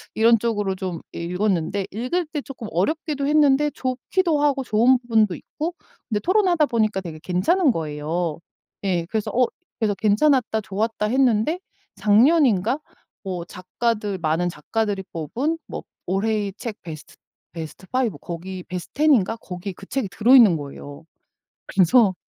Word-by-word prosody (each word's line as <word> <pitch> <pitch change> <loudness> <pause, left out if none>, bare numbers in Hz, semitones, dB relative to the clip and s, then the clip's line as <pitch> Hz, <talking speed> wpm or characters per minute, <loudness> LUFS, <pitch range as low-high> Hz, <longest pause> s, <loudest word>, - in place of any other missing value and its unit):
이런 230 +1 +5
쪽으로 205 -4 -1
좀 185 -3 -5
읽었는데 180 +1 -1
읽을 255 - -1
때 300 -1 -4
쪼끔 260 -5 -8
어렵기도 285 - -1
했는데 295 -1 +4
좋기도 295 +6 0
하고 280 -2 +2
좋은 245 +2 +4
부분도 220 -6 +2
있고 325 - -5 0.3
근데 210 -3 0
토론하다 365 -4 +3
보니까 215 -5 +1
되게 165 -4 -8
괜찮은 265 - +2
거예요. 160 -1 -3 0.4
예 180 -4 0
그래서 220 -2 -1
어 250 +1 +3 0.3
그래서 215 -3 +1
'괜찮았다. 220 +2 +2
좋았다.' 210 +1 -2
했는데 255 +5 +2 0.4
작년인가 230 - +4 0.4
뭐 180 -3 -4
작가들 205 +3 -2
많은 165 +2 0
작가들이 200 +5 -2
뽑은 240 - -2
뭐 - - -6 0.2
올해의 200 +1 0
책 225 -3 -6
베스트 155 -3 -9 0.4
베스트 165 +2 -8
5 255 -3 0
거기 180 +2 -6
베스트 180 -1 -7
10 305 +1 +4
인가 225 -2 +2
거기에 185 -2 -7
그 195 - -13
책이 265 -7 -2
들어있는 225 -4 +6
거예요. 145 +1 -9 0.6
그래서 195 +2 +4
215 Hz, 320 characters per minute, -23 LUFS, 180-260 Hz, 0.6 s, 들어있는